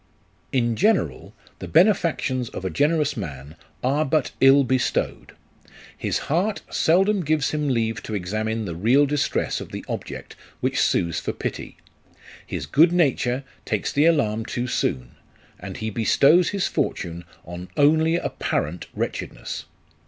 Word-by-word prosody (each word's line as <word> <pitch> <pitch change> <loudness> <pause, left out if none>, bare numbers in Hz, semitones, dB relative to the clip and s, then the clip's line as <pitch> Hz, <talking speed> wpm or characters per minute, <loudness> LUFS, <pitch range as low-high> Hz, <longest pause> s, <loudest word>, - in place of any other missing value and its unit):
In 120 -3 +1
general, 190 - 0 0.2
the - - -6
benefactions 160 - +2
of 95 - -7
a 95 - -1
generous 150 - +1
man 75 - -7 0.3
are 140 +4 +2
but 150 -1 0
ill 135 +1 +7
bestowed. 130 0 -1 0.6
His - - -1
heart 190 +7 0
seldom 195 +4 +3
gives 150 -2 +1
him 150 -1 -1
leave 115 -4 0
to 110 - -5
examine 110 +4 -2
the 85 - -4
real 120 - +3
distress 145 0 -1
of - - -9
the - - -7
object - - -6 0.2
which - - 0
sues 85 -2 +1
for - - -3
pity; - - -5 0.7
his - - -4
good 165 +5 +5
nature 140 -6 +1 0.2
takes - - -2
the 145 +2 +3
alarm 115 -10 +2
too 120 +2 -3
soon, 65 - -2 0.5
and 95 0 -7
he 110 0 -3
bestows 140 - +4
his 200 -2 -1
fortune 85 0 -2 0.2
on 90 +1 -8
only 160 +3 +4
apparent 85 - -2
wretchedness. - - -4
130 Hz, 140 wpm, -23 LUFS, 105-155 Hz, 0.7 s, ill